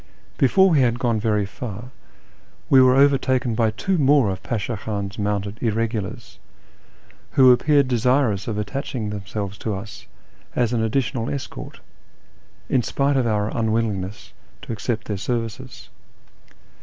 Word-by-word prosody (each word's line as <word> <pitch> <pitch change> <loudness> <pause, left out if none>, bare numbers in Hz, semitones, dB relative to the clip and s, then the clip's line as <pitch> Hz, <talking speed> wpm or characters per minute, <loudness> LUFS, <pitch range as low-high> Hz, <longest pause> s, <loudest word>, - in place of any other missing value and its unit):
Before 190 +8 +5
we 155 - +4
had 120 -2 +2
gone 120 -3 0
very 105 -2 +1
far 115 +3 -7 0.8
we 135 - +8
were 130 0 +5
overtaken 135 -3 +3
by 110 0 +2
two 175 - -1
more 140 -6 +4
of 95 0 -6
Pasha 115 -1 -3
Khan's 100 0 -5
mounted 100 +1 -2
irregulars, 115 0 -3 0.9
who 130 -2 +7
appeared 140 +2 +3
desirous 125 -4 +1
of 110 -3 -2
attaching 115 0 -4
themselves 100 0 -5
to 110 -3 -3
us 100 +2 -9 0.5
as 120 -1 +1
an 115 - +1
additional 120 +1 -1
escort, 135 -4 -7 0.9
in 130 - +2
spite 140 +4 0
of 130 -3 +2
our 105 -1 -1
unwillingness 110 -3 -2 0.3
to - - -5
accept 115 +1 -3
their 105 - -3
services. 120 +4 -5
115 Hz, 135 wpm, -22 LUFS, 105-130 Hz, 0.9 s, we